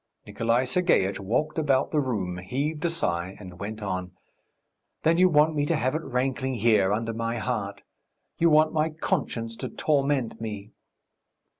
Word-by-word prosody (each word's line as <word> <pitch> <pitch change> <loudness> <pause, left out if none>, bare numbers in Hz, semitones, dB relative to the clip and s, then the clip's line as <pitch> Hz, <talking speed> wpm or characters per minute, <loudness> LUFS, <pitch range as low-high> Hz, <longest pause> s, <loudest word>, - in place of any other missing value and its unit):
Nikolay 115 +2 +1
Sergeitch 125 - +2
walked 120 +12 -1
about 140 -3 +2
the 155 - +2
room, 100 -10 -2
heaved 140 +11 -3
a - - +3
sigh, 95 - -1
and 90 -3 -11
went 105 +2 -5
on: 90 -1 -3 0.9
"Then 165 +2 +3
you 185 0 +6
want 155 0 +4
me 145 -1 0
to - - +2
have 130 +2 0
it 155 - -1
rankling 130 0 -1
here, 105 -4 +3
under 115 +2 -1
my 115 +1 -2
heart.... 105 -4 -3 0.6
You 170 - +5
want 155 0 +4
my 155 0 +1
conscience 135 -8 -2
to 130 - -5
torment 140 -3 0
me...." 105 -2 -6
125 Hz, 160 wpm, -26 LUFS, 105-150 Hz, 0.9 s, you